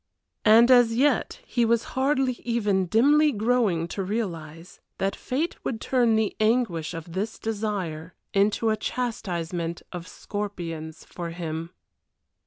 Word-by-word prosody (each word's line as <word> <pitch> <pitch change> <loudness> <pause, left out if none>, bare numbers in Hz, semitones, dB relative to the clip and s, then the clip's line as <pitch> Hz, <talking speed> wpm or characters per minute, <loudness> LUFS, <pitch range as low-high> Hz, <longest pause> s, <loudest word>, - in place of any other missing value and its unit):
And 230 +3 +7
as 245 -2 +6
yet 285 - +1
he 240 - 0
was 230 0 +2
hardly 265 0 +2
even 205 -6 +1
dimly 290 - +4
growing 215 -7 +1
to 195 - -3
realize 170 -5 -5 0.2
that 195 0 -1
fate 300 +7 -3
would 225 - -2
turn 240 -3 +2
the 220 -2 0
anguish 215 -8 +1
of 165 0 -8
this 205 +5 -3
desire 195 -7 -3 0.2
into 210 +3 +2
a - - +2
chastisement 175 -9 -3
of 175 -1 -7
scorpions 170 -6 -6
for 170 -1 -6
him. 165 -1 -5
210 Hz, 130 wpm, -26 LUFS, 170-235 Hz, 0.2 s, And